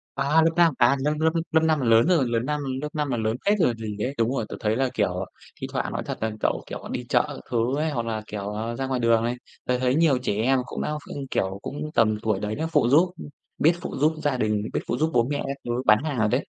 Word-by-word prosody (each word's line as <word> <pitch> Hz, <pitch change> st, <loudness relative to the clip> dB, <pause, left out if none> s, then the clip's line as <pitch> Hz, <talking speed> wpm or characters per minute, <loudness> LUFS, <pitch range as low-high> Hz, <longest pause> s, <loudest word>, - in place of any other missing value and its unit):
À, 155 Hz, +3 st, +3 dB
lớp 165 Hz, +1 st, +3 dB
5, 170 Hz, -3 st, +5 dB
à, 120 Hz, +2 st, +5 dB
lớp 150 Hz, +2 st, +1 dB
lớp 160 Hz, +1 st, +4 dB, 0.2 s
lớp 160 Hz, -, +4 dB
5 155 Hz, -2 st, +2 dB
là 130 Hz, -, -1 dB
lớn 115 Hz, +6 st, +5 dB
rồi, 170 Hz, -7 st, +3 dB
lớp 115 Hz, -1 st, +1 dB
năm 150 Hz, 0 st, -1 dB, 0.2 s
lớp 150 Hz, -, -3 dB
5 150 Hz, -2 st, -1 dB
là 120 Hz, -, 0 dB
lớn 110 Hz, 0 st, 0 dB
phết 205 Hz, 0 st, +3 dB
rồi 165 Hz, -, +4 dB
còn 115 Hz, -, -4 dB
gì 110 Hz, -2 st, -5 dB
đấy. 125 Hz, +6 st, -1 dB
Đúng 115 Hz, 0 st, +2 dB
rồi, 115 Hz, -, -1 dB
tớ -, -, -5 dB
thấy 110 Hz, -1 st, 0 dB
là, 130 Hz, +1 st, +1 dB
kiểu, -, -, 0 dB
à, -, -, -3 dB, 0.4 s
thi -, -, -3 dB
thoảng -, -, -2 dB
nói -, -, -3 dB
thật -, -, -4 dB
là 110 Hz, 0 st, 0 dB
cậu, -, -, 0 dB
kiểu, -, -, -6 dB
à, -, -, -8 dB
đi -, -, -4 dB
chợ -, -, +4 dB
các -, -, -7 dB
thứ 120 Hz, +3 st, +1 dB
ấy, 155 Hz, +1 st, 0 dB
hoặc 120 Hz, -5 st, -2 dB
là, 110 Hz, -1 st, -2 dB
kiểu, 105 Hz, 0 st, -5 dB
à, 115 Hz, +2 st, -3 dB
ra 135 Hz, +2 st, -3 dB
ngoài 130 Hz, -1 st, -1 dB
đường 115 Hz, -1 st, +3 dB
này, 120 Hz, +1 st, -1 dB, 0.3 s
tớ 125 Hz, -, +1 dB
thấy 130 Hz, +1 st, +2 dB
nhiều 155 Hz, -5 st, +4 dB
trẻ 125 Hz, -, -2 dB
em 130 Hz, +5 st, +2 dB
cũng -, -, -5 dB
đã -, -, -2 dB
ph -, -, -8 dB
kiểu, 95 Hz, +1 st, -1 dB
cũng 150 Hz, +2 st, -5 dB
tầm 110 Hz, -2 st, +3 dB
tuổi 110 Hz, -3 st, 0 dB
đấy 105 Hz, +1 st, -3 dB
nó 160 Hz, +2 st, -2 dB
phụ 145 Hz, -6 st, +3 dB
giúp, 165 Hz, +7 st, +5 dB
ưm, -, -, -8 dB, 0.3 s
biết 160 Hz, +3 st, +4 dB
phụ -, -, -5 dB
giúp 155 Hz, +3 st, +3 dB
gia 140 Hz, -3 st, +1 dB
đình, 105 Hz, -2 st, 0 dB
biết -, -, +1 dB
phụ 120 Hz, -, -1 dB
giúp 155 Hz, +4 st, +1 dB
bố 120 Hz, -1 st, +4 dB
mẹ 145 Hz, -, -1 dB
các 140 Hz, 0 st, -3 dB
thứ 120 Hz, -, -2 dB
bán 105 Hz, +5 st, +5 dB
hàng 150 Hz, -4 st, -2 dB
rồi 110 Hz, -1 st, +3 dB
đấy. 125 Hz, +4 st, +2 dB
125 Hz, 300 wpm, -25 LUFS, 115-150 Hz, 0.4 s, 5